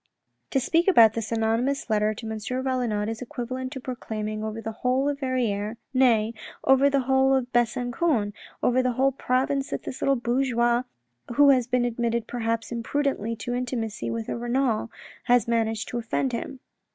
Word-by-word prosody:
" - - -50
To 270 - +1
speak 330 +7 +1
about 230 - +7
this 225 -1 -4
anonymous 230 +5 0
letter 215 -1 +1
to 225 - -8
M. 220 0 -4
Valenod 250 -3 -1
is 225 +1 -4
equivalent 255 +1 -5
to 265 - -5
proclaiming 215 -4 -4
over 220 +1 -4
the 225 0 -4
whole 255 +2 +2
of 285 -1 -1
Verrieres, 230 -5 -1 0.2
nay, 230 -4 +3 0.3
over 270 +1 +5
the 275 -1 +2
whole 265 +1 +3
of 250 -1 -2
Besancon, 240 0 +1 0.3
over 250 +1 +3
the 255 -1 0
whole 270 +3 +2
province 270 +1 0
that - - -4
this 260 - -7
little 275 - +3
bourgeois 240 -1 +1 0.5
who 285 +1 +7
has 250 -3 +2
been 250 -1 +1
admitted 235 -1 -1
perhaps 230 -2 -2
imprudently 235 -1 -1
to 245 +2 -4
intimacy 235 - -3
with 115 -1 -3
a - - -2
Renal, 240 -1 0 0.4
has 245 -2 +3
managed 225 -1 0
to 240 - -2
offend 240 +3 -1
him. 255 +2 -5
240 Hz, 175 wpm, -25 LUFS, 225-260 Hz, 0.5 s, about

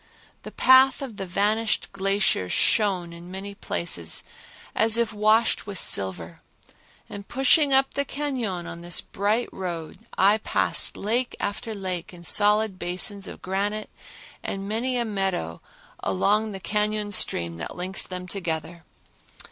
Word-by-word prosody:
The - - -9
path 260 +1 +5
of 235 -6 -7
the 195 - -5
vanished 210 +4 0
glacier 195 - +1
shone 185 - +2
in 170 +1 -11
many 195 +2 -6
places 85 - -1 0.5
as 225 +1 +5
if 235 -1 0
washed 215 +2 +2
with 200 -2 -5
silver, 85 - 0 0.7
and 200 0 -9
pushing 270 +3 +3
up 270 0 +3
the 280 - 0
cañon 255 -12 -3
on 170 - -8
this 175 0 -1
bright 210 +5 -1
road 170 -4 -5 0.2
I 205 +3 +5
passed - - 0
lake 240 +5 -1
after 215 +2 -3
lake 185 -3 -4
in 170 - -13
solid 210 +1 +4
basins 190 +3 -1
of - - -9
granite 205 +3 -2 0.5
and 195 0 -5
many 245 +4 -1
a 240 - 0
meadow 190 - -2 0.4
along 210 - +1
the 195 - -6
cañon 210 +1 -1
stream 85 - 0
that 80 - -6
links 185 +2 +1
them 180 0 -6
together. 170 -3 -4
200 Hz, 140 wpm, -25 LUFS, 175-220 Hz, 0.7 s, path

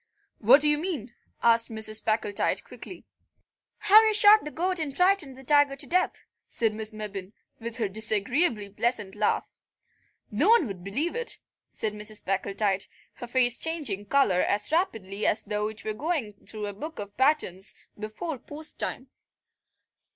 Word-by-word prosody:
"What 250 +7 +6
do 300 - +8
you 295 0 +4
mean?" 300 - -4 0.3
asked 230 0 +4
Mrs. 220 -1 -2
Packletide 215 -2 0
quickly. - - -11 0.7
"How 425 +1 +7
you 435 -1 +2
shot 425 +1 +7
the 300 - -5
goat 360 +3 -1
and 290 -4 -4
frightened 360 -8 +2
the 265 - -12
tiger 290 0 +3
to 275 - -6
death," 365 +1 0 0.3
said 225 -2 +1
Miss 215 0 -2
Mebbin, 205 -2 -7 0.3
with 230 +1 -5
her 225 -4 0
disagreeably 215 - 0
pleasant 210 -1 -1
laugh. - - 0 0.8
"No - - +2
one 460 -8 +6
would 195 -6 -7
believe 275 - -2
it," 480 0 -1 0.3
said 215 -1 -1
Mrs. 210 0 -3
Packletide, 195 0 0 0.3
her 245 - -7
face 245 -1 +2
changing 280 - -2
colour 200 -11 +3
as 205 +7 0
rapidly 220 - -1
as 220 - +1
though 210 0 -2
it 220 0 -9
were 215 - -2
going 275 -3 -2
through 215 -1 -5
a 205 - -5
book 310 +11 -8
of 205 0 -7
patterns 260 - +1 0.2
before 220 +8 -6
post 300 +4 -9
time. - - -4
230 Hz, 160 wpm, -27 LUFS, 210-305 Hz, 0.8 s, do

